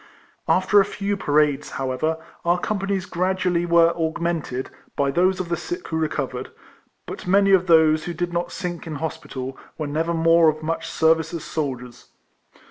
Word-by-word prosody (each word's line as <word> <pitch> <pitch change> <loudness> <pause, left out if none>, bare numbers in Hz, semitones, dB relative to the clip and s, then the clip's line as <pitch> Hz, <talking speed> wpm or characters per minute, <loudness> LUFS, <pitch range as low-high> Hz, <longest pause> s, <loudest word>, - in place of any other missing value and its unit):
After 205 - +4
a - - +1
few 200 0 -2
parades, 150 -5 +1
however, 135 +5 -1 0.3
our 175 +1 +2
com 205 +3 -2
panies 195 -1 -2
gradually 180 -1 0
were 170 0 +5
augmented 160 -5 -2 0.2
(by 140 -1 +1
those 185 +4 +2
of 180 -2 -4
the 170 - +1
sick 350 - -6
who 160 - -3
recovered), 140 -5 -2 0.6
but - - -8
many 195 +1 +4
of 185 -1 +4
those 160 -2 +5
who 175 - -4
did 175 0 -3
not 175 0 -2
sink 175 -2 -5
in 155 - -5
hospital, 135 -4 -5 0.2
were 155 - -3
never 160 +3 -1
more 165 0 +5
of 155 0 -4
much 165 +1 -3
service 160 +1 +2
as 165 - -5
soldiers. 125 -6 -5
165 Hz, 170 wpm, -23 LUFS, 155-180 Hz, 0.6 s, were